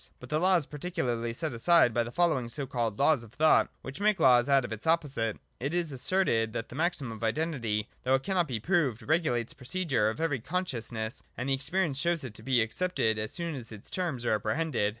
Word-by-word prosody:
But - - -11
the 150 - +1
Law 185 +2 +4
is 165 -5 +2
particularly 135 -8 -2
set 145 +4 -3
aside 125 +1 +4
by 120 +1 +2
the 120 - -7
following 155 -6 +1
so 140 +4 -4
called 120 -5 -2
Laws 140 -3 +3
of 115 0 -15
Thought, 155 +4 +4
which 135 +6 -7
make 210 -2 +2
laws 125 -3 +5
out 135 -2 +4
of 115 - -5
its 110 +7 -7
opposite. 140 -9 +1
— - - -43
It 170 - -3
is 170 -3 0
asserted 125 -6 +1
that 115 - -4
the - - -9
maxim 155 -5 -1
of 110 +1 -8
Identity, 115 -5 -1
though 130 +1 +3
it 135 - -1
cannot 180 -2 +1
be 120 -5 -3
proved, 145 - +1
regulates 145 -8 0
the - - -30
procedure 130 - 0
of 110 - -5
every 160 -5 0
consciousness, 120 -7 -3 0.2
and 125 +3 -3
that - - +3
experience 140 +1 0
shows 170 0 +1
it 125 -5 -6
to 110 - -11
be 125 -1 +3
accepted 110 -4 0
as 110 +1 -3
soon 170 -2 -4
as 120 -5 -8
its 105 -2 -10
terms 160 -10 -2
are 115 - +2
apprehended. 110 +1 0
135 Hz, 230 wpm, -29 LUFS, 115-165 Hz, 0.2 s, laws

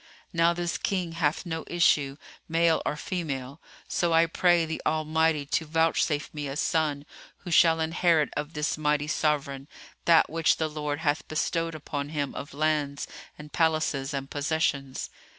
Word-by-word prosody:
Now 170 0 +4
this 175 0 -2
King 185 -4 -1
hath 165 0 0
no 160 -2 -4
issue, 145 -5 +2 0.3
male 165 0 +3
or - - 0
female, 140 -5 -4 0.3
so 170 -1 0
I 165 +1 +6
pray 170 0 +3
the 160 0 -4
Almighty 155 -1 +1
to 160 +3 -1
vouchsafe 160 -2 +1
me 150 -2 -4
a 135 - -5
son 150 -2 0 0.4
who 180 - -6
shall 165 0 +5
inherit 160 -1 +2
of 150 +2 -4
this 150 +1 -1
mighty 150 -1 +1
sovran 145 -3 -1 0.4
that 165 -1 +6
which 165 0 +2
the 160 - 0
Lord 150 0 -3
hath 145 -3 0
bestowed 165 +1 -1
upon 145 -1 -4
him 145 -3 -2
of 140 - -7
lands 150 -2 0 0.3
and 150 0 -11
palaces 155 -4 +1
and 135 -1 -3
possessions." 145 -2 -1
155 Hz, 155 wpm, -27 LUFS, 145-165 Hz, 0.4 s, I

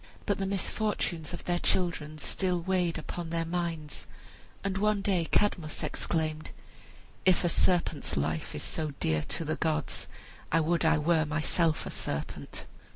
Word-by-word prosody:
But 200 -2 +1
the 195 - 0
misfortunes 195 -4 -1
of - - -5
their 175 0 +1
children 165 -5 0
still 180 +4 0
weighed 180 -2 +1
upon 165 +1 -5
their 165 0 0
minds; 165 -3 -2 0.6
and 195 -1 -1
one 210 0 +2
day 185 -5 +2
Cadmus 170 -5 +1
exclaimed, 155 -2 -1 0.7
"If 185 0 +4
a 175 - +3
serpent's 170 - +2
life 80 +2 -1
is - - -4
so 155 -3 -2
dear 80 -1 +2
to 165 - -1
the 155 - -1
gods, 160 -3 -1 0.4
I 165 - +5
would 165 +1 +2
I 160 0 +5
were 160 +1 +3
myself 155 +1 +2
a - - -4
serpent." 70 - -4
165 Hz, 155 wpm, -30 LUFS, 155-180 Hz, 0.7 s, I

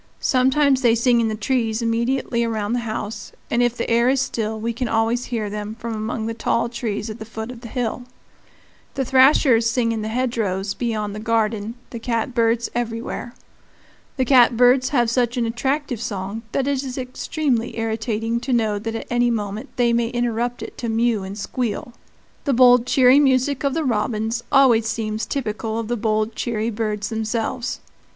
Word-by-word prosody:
Sometimes 265 +1 +3
they 235 -3 +4
sing 235 0 +3
in 225 - +1
the 215 - -2
trees 225 0 0
immediately 235 +1 0
around 220 -1 -1
the 245 - +1
house, 215 -2 -5 0.2
and 240 - +2
if 240 0 +1
the - - -2
air 235 +2 +3
is 270 +1 +2
still 220 -4 -2
we 230 +2 -2
can 245 +2 -2
always 225 +2 +1
hear 225 -4 -2
them 210 +1 -5
from 235 -1 -5
among 220 0 -3
the 230 - -2
tall 235 +1 0
trees 220 -3 -3
at 215 - -9
the - - -5
foot 220 +2 -6
of 240 -2 -11
the 240 - -8
hill. 245 +1 -3 0.9
The 270 -1 -1
thrashers 260 -3 +5
sing 230 -1 +1
in 225 -1 -2
the 215 - -3
hedgerows 220 -5 -1
beyond 215 -4 -2
the 210 - -6
garden, 220 0 0 0.2
the 235 - -5
catbirds 230 0 0
everywhere. 240 +1 -4 0.8
The 260 - +1
catbirds 250 0 +5
have 240 -5 +2
such 240 +1 0
an 240 - +1
attractive 255 +1 -2
song 200 0 -4
that 270 - 0
it 280 -2 0
is 260 -1 -6
extremely 255 -1 -2
irritating 225 0 -1
to 260 +2 -4
know 220 -4 +1
that 225 +2 -4
at 225 - -5
any 240 0 +3
moment 210 -2 -3
they 240 -2 +2
may 235 0 +2
interrupt 240 0 -1
it - - -9
to 235 - -3
mew 225 -1 +1
and 190 +1 -7
squeal. 235 +2 -3 0.5
The 280 - +2
bold, 245 0 +6
cheery 260 0 +6
music 270 0 +2
of 280 0 0
the 325 - 0
robins 225 -1 -1
always 240 -5 +5
seems 220 -1 -2
typical 220 -4 -3
of 230 -1 -4
the 240 - +1
bold, 215 0 0
cheery 230 -1 -2
birds 210 -1 -2
themselves. 225 +2 -2
235 Hz, 185 wpm, -22 LUFS, 220-250 Hz, 0.9 s, bold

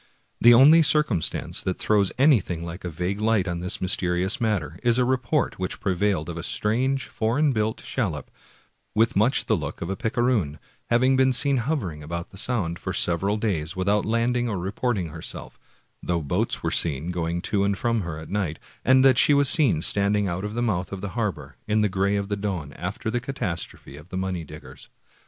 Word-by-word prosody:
The 120 0 +7
only 150 +7 +8
cir 150 0 +4
cumstance 90 - -2
that 95 - -2
throws 105 -2 +2
anything 110 - +2
like 85 +2 -8
a 90 - -3
vague 90 +5 -3
light 110 -4 +2
on 85 -1 -2
this 90 +1 -2
mysterious 90 +5 0
matter 90 - -1
is 120 0 +3
a 125 - +3
report 130 +1 0
which 90 - -3
prevailed 95 -4 0
of 85 -1 -6
a - - -4
strange, 130 +9 -1
foreign 130 +7 +1
built 110 -1 -1
shallop, 90 - -3 0.6
with 115 +1 +2
much 115 +7 +2
the 110 - +2
look 75 -5 -5
of 85 - -4
a - - -2
picaroon,^ 115 - 0 0.3
having 130 +3 +3
been 130 0 +4
seen 140 +2 +3
hovering 115 - -2
about 85 +3 -6
the 95 - -12
Sound 100 -9 -1
for - - -4
several 95 +5 +1
days 85 -8 -2
without 100 +3 +1
landing 120 +2 0
or 100 - -2
reporting 95 0 -2
herself, - - -7 0.4
though 85 -2 -1
boats 70 - -1
were - - 0
seen 80 +1 -1
going 85 -1 -2
to 100 -2 0
and 100 -1 0
from 115 0 0
her 85 -4 -5
at 80 - -9
night; 95 -6 -1 0.3
and 130 +1 +5
that 130 -2 +5
she 145 - +5
was 140 -1 +4
seen 120 - +3
standing 100 0 +1
out 90 +1 -3
of 105 +1 -4
the 120 - -1
mouth 95 -6 -1
of 100 -1 -6
the 100 - -4
harbor, 90 - -4
in 110 0 +2
the 105 - +3
gray 100 +1 0
of 100 -1 -2
the 100 - -1
dawn, 95 -8 -4
after 105 +6 -4
the 120 - 0
catastrophe 100 - -5
of 75 +4 -14
the 95 - -5
money 95 -2 -2
diggers. 75 0 -12
100 Hz, 200 wpm, -24 LUFS, 85-120 Hz, 0.6 s, only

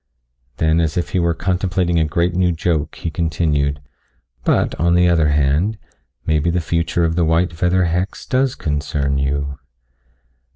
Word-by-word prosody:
Then 80 +1 +2
as 80 0 -1
if 85 - -1
he 95 - 0
were 85 -1 +1
contemplating 90 -1 0
a 80 - +2
great 85 +3 0
new 90 0 +2
joke 80 -2 -1
he 85 - -5
continued. 75 -3 0 0.6
"But - - +1
on 85 +2 +3
the 90 0 +4
other 85 -3 +3
hand, 75 +8 +1 0.5
maybe 80 +1 +1
the 90 +1 +1
future 85 +1 -1
of 80 0 -1
the 85 - +2
white 85 +2 +1
feather 90 +3 +1
hex 90 +3 -2
does 130 0 +1
concern 70 -2 -2
you." 70 0 -2
85 Hz, 160 wpm, -19 LUFS, 75-90 Hz, 0.6 s, the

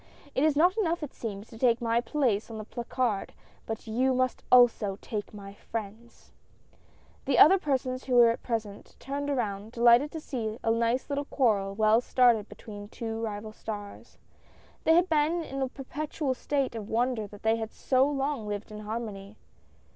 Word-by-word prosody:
It 265 - +1
is 310 -2 +3
not 350 +6 +4
enough 340 -5 0
it 295 - -6
seems, 210 -2 -6
to 225 - -12
take 240 -2 +3
my 235 -1 +1
place 240 -6 0
on 225 - -7
the 215 - -5
placard, 235 -1 -2 0.3
but 225 0 -5
you 255 +4 +1
must 255 0 0
also 230 -5 +5
take 210 -2 -5
my 200 -2 -10
friends! 220 +2 -8 0.4
" - - -32
The 265 -3 +2
other 375 +10 +8
persons 260 -4 -2
who 255 - 0
were 235 -1 +6
present, 220 -4 -5
turned 285 +1 -4
around, 220 -5 -2
delighted 240 +4 +5
to 320 - -4
see 230 -7 -4
a 225 - +2
nice 230 +2 +1
little 285 0 -2
quarrel 205 -9 +1
well 215 +2 +4
started 240 -4 +3
between 205 -2 -10
the 205 - -9
two 225 +1 -5
rival 215 -1 -4
stars. 205 -2 -8 0.7
They 320 - +6
had 350 +2 +4
been 320 +2 +1
in 275 -3 -5
a 265 - 0
per 270 - -9
petual 290 0 -3
state 275 -1 -1
of 220 -2 -6
wonder 235 -1 0
that 205 0 -14
they 220 +1 +3
had 220 -1 -5
so 265 +1 +2
long 275 -5 -2
lived 205 +1 -5
in 210 - -7
harmony. 210 -2 -6
235 Hz, 185 wpm, -28 LUFS, 215-270 Hz, 0.7 s, other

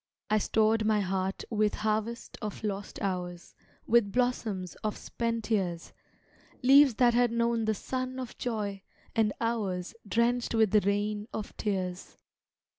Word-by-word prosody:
I 215 - +4
stored 220 +1 +2
my 215 -1 +3
heart 190 0 -2
with 215 -1 +2
harvest 220 +2 -2
of 215 0 -5
lost 205 -1 -4
hours 180 -2 -3 0.3
With 225 -3 +3
blossoms 225 -7 -1
of 215 -1 -1
spent 230 -1 -3
years; 180 -5 -1 0.7
Leaves 270 -1 +7
that 240 0 +4
had 240 0 +3
known 235 -1 +1
the 220 0 +1
sun 255 +3 -3
of 255 -2 -6
joy, 210 -5 -2 0.3
and 220 -2 +3
hours 205 -6 -1
Drenched 235 +2 +1
with 220 -3 +4
the 210 - +5
rain 205 +1 -1
of 215 - -5
tears. 185 -3 -3
215 Hz, 140 wpm, -29 LUFS, 200-235 Hz, 0.7 s, Leaves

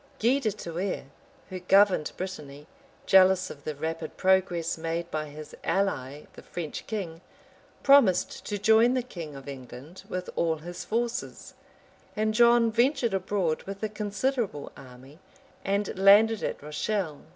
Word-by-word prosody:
Gui 250 +5 +3
de 235 -6 0
Thouars, 185 -2 -4 0.5
who 185 - -5
governed 190 -3 +3
Brittany, 150 -6 -7 0.4
jealous 190 -1 +5
of 145 - -13
the 155 - -3
rapid 160 +3 -5
progress 185 -3 +1
made 165 +1 -4
by 155 0 -2
his 150 +1 -10
ally, 150 -8 -1
the - - -12
French 165 -4 -7
king, 180 -7 -5 0.6
promised 275 -10 +4
to 205 - -2
join 220 +4 +4
the 255 - 0
king 165 - -8
of 135 0 -11
England 135 +5 -10
with 185 0 -4
all 165 -1 +1
his 175 +3 -8
forces; 240 +2 -3 0.6
and 215 0 0
John 235 0 +5
ventured 240 0 +1
abroad 185 -4 -1
with 195 +1 -7
a 215 - 0
considerable 210 - -2
army, 130 +4 -14 0.4
and 200 +1 -1
landed 210 +3 +6
at - - -4
Rochelle. 155 +1 -3
190 Hz, 140 wpm, -27 LUFS, 160-215 Hz, 0.6 s, landed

